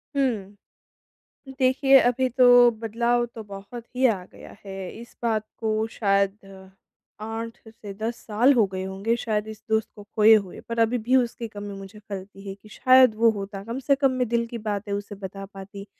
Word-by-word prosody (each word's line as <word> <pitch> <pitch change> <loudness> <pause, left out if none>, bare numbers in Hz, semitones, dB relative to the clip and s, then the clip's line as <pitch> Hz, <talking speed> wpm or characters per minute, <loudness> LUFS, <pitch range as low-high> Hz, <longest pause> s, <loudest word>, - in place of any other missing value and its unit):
हुँ। 215 -8 -1 1.0
देखिए, 270 +1 +5
अभी 250 +2 +2
तो 250 +1 +3 0.3
बदलाव 235 +2 0
तो 225 - -7
बहुत 200 +4 -9
ही 260 +1 +2
आ 195 -6 -1
गया - - -13
है। 195 - -7 0.2
इस 235 - -13
बात 220 -2 +1 0.2
को 220 0 0
शायद 200 -1 +1 0.8
8 225 +1 -5
से 220 -3 -10
10 225 +3 -4
साल 235 +6 +4
हो 225 -5 +4
गए 190 0 -5
होंगे 195 +5 -1
शायद 215 -2 -2
इस 220 -1 -9
दोस्त 220 0 +1
को 205 - -11
खोए 220 +1 +7
हुए। 200 -4 -2
पर 230 0 -2
अभी 230 +2 +2
भी 245 +3 +1
उसकी 240 -2 0
कमी 205 -2 -8
मुझे 195 +2 -11
खलती 200 -1 -9
है 195 - -5
कि 210 +1 -19
शायद 255 -1 +5
वो 230 +1 +4
होता 200 -1 -6
कम 230 +5 -5
से 275 +1 +2
कम 270 -1 +2
मैं 250 -2 -1
दिल 235 0 +1
की 235 - -6
बातें 210 -2 -4
उसे 205 +1 -5
बता 195 0 -8
पाती, 195 +1 -9
220 Hz, 190 wpm, -24 LUFS, 200-235 Hz, 1.0 s, खोए